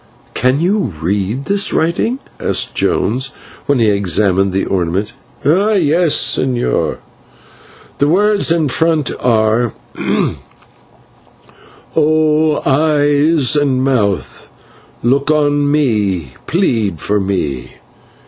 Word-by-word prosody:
"Can 130 +2 +1
you 180 - 0
read 100 - -2
this 200 +3 +2
writing?" 170 +10 0 0.2
asked - - -1
Jones, 125 +6 0 0.4
when 140 - +2
he 115 - +2
had 105 -2 +2
examined 95 0 +1
the 95 +1 -1
ornament. 95 +2 -2 0.3
"Yes, 175 -2 +2
señor. 125 -2 0 1.0
The 145 - +3
words 205 +5 +2
in 165 -3 +2
front 160 +1 +1
are: 115 -1 +1 2.2
'O 155 0 +2
Eyes 145 0 +2
and 135 -3 +1
Mouth, 110 -8 -1 0.5
look 135 +5 +1
on 145 -1 +2
me, 105 - 0 0.2
plead 115 - 0
for 105 +5 0
me.' 90 -10 -3
135 Hz, 100 wpm, -15 LUFS, 105-155 Hz, 2.2 s, The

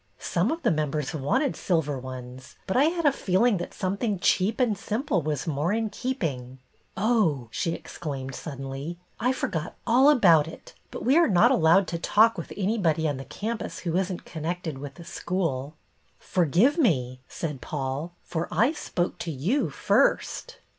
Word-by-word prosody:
Some - - 0
of 330 +1 -3
the - - +3
members 150 -1 -1
wanted 245 - 0
silver 150 -6 0
ones, 130 0 -9
but 190 - -2
I 265 +3 +5
had 335 0 0
a 290 - +6
feeling 210 -1 +2
that 175 - -5
something 200 +3 -1
cheap 190 +5 +2
and 240 -5 +2
simple 215 - -1
was 150 -1 -2
more 155 +2 0
in 220 0 -1
keeping. 155 - -3 0.4
Oh 200 - +2
I - - -17
" - - -37
she 165 +8 -1
exclaimed 135 -4 -6
suddenly, 135 +3 -6
" - - -39
I 250 +3 +2
forgot 170 -10 -3
all 255 +5 +5
about 170 - +5
it, 165 - -11 0.2
but - - -7
we 265 +6 +5
are 340 - +5
not 175 -4 +5
allowed 170 +4 +5
to 170 - -3
talk 220 +6 +4
with - - -7
anybody 185 -6 +1
on 145 -3 -1
the 135 - -7
campus 220 - -5
who 165 -1 -1
is 190 +1 +1
n't 180 - -6
connected 160 -2 -4
with 140 0 -8
the 170 - -11
school." 160 -7 -2 0.2
" - - -40
Forgive 185 - +2
me," 130 - +1
said 150 -5 -5
Paul, 140 +4 -4
" - - -41
for 170 -1 -3
I 235 +6 +3
spoke 180 - -3
to 165 - -3
you 175 - 0
first." - - +1
175 Hz, 185 wpm, -26 LUFS, 145-220 Hz, 0.4 s, a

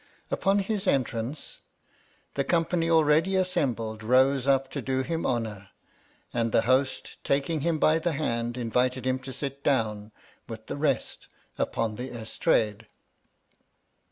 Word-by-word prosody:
Upon 195 +1 +2
his 200 0 -1
en 135 -6 +4
trance, 120 +5 -5 0.7
the 140 - 0
company 165 +2 +1
already 160 +3 +4
assembled 120 - 0
rose 130 +3 +3
up 135 -1 +2
to - - -3
do 130 0 -1
him 165 +3 -2
honour, 110 -5 -3 0.6
and 115 -1 0
the 110 - +3
host 130 +3 0
taking 140 +3 0
him 165 +2 0
by 155 +1 +4
the 170 0 -1
hand 120 -4 -2
invited 125 +2 0
him 130 0 +1
to 130 0 -8
sit 140 +1 -5
down, 110 -5 0 0.4
with 110 -1 -8
the - - -5
rest 140 -4 -1 0.3
upon 110 -2 -1
the 125 +2 -5
estrade. 110 -1 0
130 Hz, 140 wpm, -27 LUFS, 115-155 Hz, 0.7 s, en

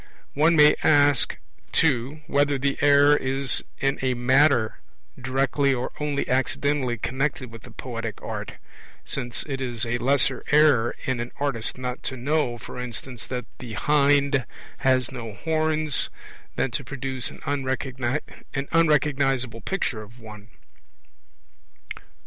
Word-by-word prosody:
One 160 +4 +4
may 150 -1 +7
ask, 145 -3 +4 0.3
too, 140 0 +1
whether 145 -2 +2
the 140 +1 0
error 145 0 +6
is 135 -1 +1
in 135 0 0
a 130 -1 +1
matter 130 -1 +3 0.4
directly 135 +2 +1
or 125 0 -3
only 145 -1 -1
accidentally 130 0 0
connected 130 +1 -2
with 115 -1 -10
the - - -13
poetic 115 -4 -6
art; - - -6 0.5
since 120 -3 -4
it 135 -3 -5
is 120 -2 -3
a 120 +1 -1
lesser 135 0 +1
error 145 -6 +4
in 130 -2 -1
an 120 +1 -3
artist 135 -6 0
not 125 0 -4
to 130 - -3
know, 130 -1 0
for 125 - -9
instance, 125 0 -7
that 125 -2 -4
the 120 -4 -7
hind 140 -2 +2 0.3
has 130 -2 +2
no 115 -5 -6
horns, 155 +1 0 0.5
than 135 - 0
to 140 +2 -3
produce 135 -1 -4
an - - -12
unrecognizable 135 0 0
picture 135 - -2
of 110 +4 -14
one. 105 -2 -11
135 Hz, 130 wpm, -25 LUFS, 125-145 Hz, 0.5 s, may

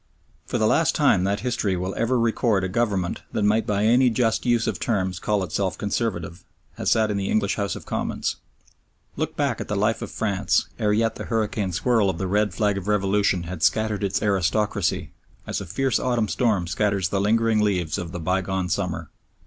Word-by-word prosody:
For - - -1
the - - +2
last - - +3
time 90 - +3
that 100 +1 0
history 115 -7 -1
will 95 +2 -3
ever 120 +2 +1
record 115 -3 +1
a - - 0
government 100 -3 -1
that 105 - 0
might 105 +2 +2
by 105 0 +1
any 125 +3 +5
just 115 0 0
use 120 -1 +3
of - - -2
terms 95 -5 -1
call 105 -2 0
itself 95 +2 -2
"Conservative" 95 -5 -3 0.3
has - - 0
sat 110 -1 +3
in 100 - -1
the 95 -1 -2
English 105 -2 +1
House 100 -1 -2
of - - -9
Commons. - - -2 0.8
Look - - -3
back - - 0
at - - -5
the - - -2
life - - +1
of - - -5
France 100 -4 0
ere 105 -1 +2
yet 115 +2 +1
the - - -6
hurricane 105 -3 -1
swirl 110 +2 +2
of 90 - -2
the 95 - -2
red 105 +2 +1
flag 100 +1 0
of 95 - -10
revolution 100 -2 +1
had 85 0 -6
scattered 110 0 +1
its 100 - 0
aristocracy 100 -1 0 0.3
as - - -3
a 100 - -7
fierce 130 +8 0
autumn 120 -4 0
storm 100 -1 +1
scatters 95 0 0
the 100 +1 0
lingering 110 +1 +2
leaves 90 -7 0
of 85 -2 -5
the 90 - -5
bygone 95 +1 -1
summer. 90 -4 -2
100 Hz, 200 wpm, -24 LUFS, 95-110 Hz, 0.8 s, any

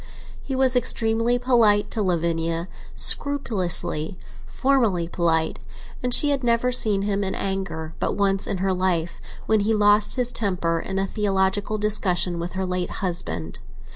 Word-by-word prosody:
He 270 - -5
was 260 -1 +3
extremely 230 -1 +2
polite 225 -5 +3
to 220 - -1
Lavinia, 170 -2 -1 0.3
scrupulously, 200 - +1 0.3
formally 230 -11 +1
polite; 165 -2 0 0.4
and 250 - -2
she 290 +4 +6
had 275 -2 0
never 235 +1 +1
seen 210 -5 +2
him 200 0 -1
in 190 - -2
anger 175 -5 -4
but - - -1
once 195 -1 0
in 195 - -2
her 190 - +1
life, 180 -2 -1 0.2
when 220 -1 +2
he 215 +2 +1
lost 210 0 +3
his 245 -1 0
temper 180 -6 -1
in 190 +3 -5
a 195 - 0
theological 200 0 -1
discussion 190 -4 +1
with 170 +1 -5
her 190 0 -2
late 180 -1 -2 0.2
husband. 85 - -4
195 Hz, 150 wpm, -23 LUFS, 175-225 Hz, 0.4 s, she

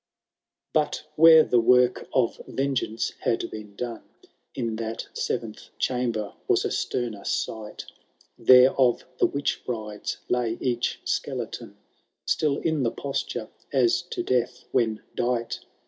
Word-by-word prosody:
VI. - - -64
But 150 -1 +1
where 160 0 +9
the 120 - +3
work 125 +1 +4
of 125 -3 +1
yengeance 135 -5 -1
had 115 - -1
been 105 -2 -9
done, 120 +1 -5 0.5
In 115 -2 -2
that 115 0 -4
seventh - - -4
chamber, 120 -5 -1
was - - +2
a - - -1
sterner 115 -5 -2
sight; 110 -1 -3 0.5
There 130 +1 +7
of 125 -3 +3
the - - +5
witch 140 0 -2
brides 110 -4 -4
lay 120 -2 0
each 120 -2 -1
skeleton, - - -3 0.5
Still 145 -2 +1
in 160 -3 0
the 120 - +2
posture 140 +3 -4 0.2
as 130 +6 +3
to - - -3
death 125 -6 0
when 110 -4 +1
dight. 120 -1 -1
120 Hz, 130 wpm, -26 LUFS, 115-130 Hz, 0.5 s, where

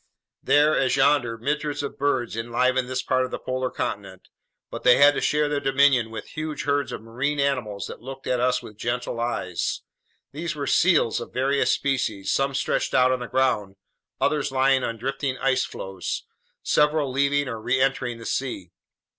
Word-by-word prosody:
There 150 +1 +4
as 130 -2 +2
yonder, 135 -4 +2
myriads 145 +4 -2
of 140 - -6
birds 130 -5 0
enlivened 125 +2 0
this 130 0 -2
part 130 0 +1
of 130 - -3
the - - -4
polar 130 0 -3
continent. - - -5 0.4
But - - -6
they 125 -1 +6
had 145 +1 +7
to - - -2
share 150 0 +2
their 145 -1 -1
dominion 135 -3 +3
with 110 -1 -8
huge 155 -1 -4
herds 145 0 0
of - - -6
marine 130 +6 -2
mammals 125 -8 -1
that - - -9
looked 135 +2 -9
at 125 - 0
us 125 +1 +1
with 105 - -12
gentle 120 0 -2
eyes. 115 -7 -2 0.5
These 160 +3 -4
were 145 -1 -3
seals 160 -8 +3
of - - -8
various 135 +2 +1
species, 125 -8 -1
some 135 0 +1
stretched - - -1
out 130 0 +5
on 130 - 0
the 125 - -5
ground, 115 -8 0 0.4
others 150 -3 +1
lying 135 0 +3
on 115 -1 -3
drifting 135 +2 -3
ice 130 0 +1
floes, 95 -2 -5 0.4
several 150 -2 +2
leaving 140 +1 +1
or 115 -3 -5
reentering 130 0 0
the 115 - -11
sea. 100 -10 -3
130 Hz, 180 wpm, -24 LUFS, 120-140 Hz, 0.5 s, had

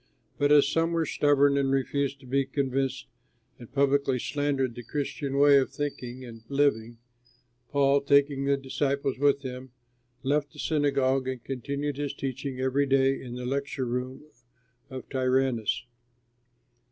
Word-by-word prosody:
But 145 0 +3
as 145 -2 +6
some 165 +3 +1
were 165 -1 +1
stubborn 145 -1 +3
and 135 -1 +1
refused 135 +1 -1
to - - -15
be 135 +2 +1
convinced 135 -1 -1 0.5
and 120 - -12
publicly 140 -1 +2
slandered 140 -1 -1
the 120 - -8
Christian 140 +2 -3
way 140 0 +7
of 130 - -1
thinking 130 -3 -5
and 115 -2 -11
living, 130 -5 +1 0.7
Paul, 140 0 +3
taking 140 0 +3
the 140 0 +2
disciples 135 0 -2
with 140 0 +2
him, 130 -1 -7 0.5
left 145 +2 0
the - - -16
synagogue 135 -4 +1
and 130 -2 -4
continued 140 +2 -4
his 145 -1 -3
teaching 135 0 -4
every 130 +2 +1
day 135 0 +2
in 125 -2 -7
the 125 0 -5
lecture 140 0 -2
room 125 +3 -4 0.7
of 130 -1 -8
Tyrannus. 130 -4 0
135 Hz, 145 wpm, -27 LUFS, 130-140 Hz, 0.7 s, way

